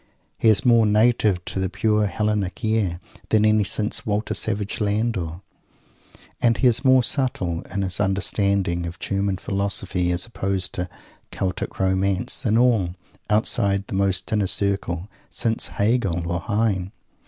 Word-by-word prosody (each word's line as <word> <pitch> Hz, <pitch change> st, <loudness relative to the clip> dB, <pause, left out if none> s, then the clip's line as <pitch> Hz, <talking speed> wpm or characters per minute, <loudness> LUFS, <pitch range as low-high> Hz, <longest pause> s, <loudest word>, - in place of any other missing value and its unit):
He 115 Hz, -, +4 dB
is 100 Hz, -3 st, +3 dB
more 115 Hz, -3 st, +5 dB
native 105 Hz, -3 st, +2 dB
to -, -, -4 dB
the 95 Hz, -1 st, 0 dB
pure 105 Hz, +1 st, +1 dB
Hellenic 105 Hz, 0 st, -2 dB
air 105 Hz, -6 st, 0 dB, 0.3 s
than 110 Hz, -1 st, +3 dB
any 110 Hz, 0 st, +4 dB
since 105 Hz, +4 st, -1 dB
Walter 105 Hz, +1 st, -1 dB
Savage 105 Hz, 0 st, -2 dB
Landor. 100 Hz, -5 st, -1 dB, 1.0 s
And 115 Hz, -1 st, +3 dB
he -, -, 0 dB
is 120 Hz, +1 st, +3 dB
more 130 Hz, -2 st, +5 dB
subtle, 95 Hz, -, -1 dB
in 100 Hz, +1 st, -1 dB
his 95 Hz, -1 st, -2 dB
understanding 95 Hz, -2 st, 0 dB
of 85 Hz, +1 st, -7 dB
"German 100 Hz, -1 st, -1 dB
Philosophy" 95 Hz, -2 st, -1 dB
as 90 Hz, +1 st, 0 dB
opposed 95 Hz, -5 st, -3 dB
to 90 Hz, 0 st, -3 dB, 0.4 s
"Celtic 95 Hz, -2 st, -3 dB
Romance," 95 Hz, +2 st, +1 dB
than 115 Hz, -4 st, +2 dB
all 110 Hz, -8 st, +2 dB, 0.3 s
outside 100 Hz, -2 st, +2 dB
the -, -, -8 dB
most 95 Hz, +1 st, 0 dB
inner 105 Hz, -2 st, +1 dB
circles 95 Hz, -3 st, -1 dB, 0.3 s
since 115 Hz, -1 st, 0 dB
Hegel 100 Hz, -6 st, 0 dB
or 90 Hz, -, -1 dB
Heine! 100 Hz, -1 st, -1 dB
100 Hz, 145 wpm, -23 LUFS, 95-110 Hz, 1.0 s, more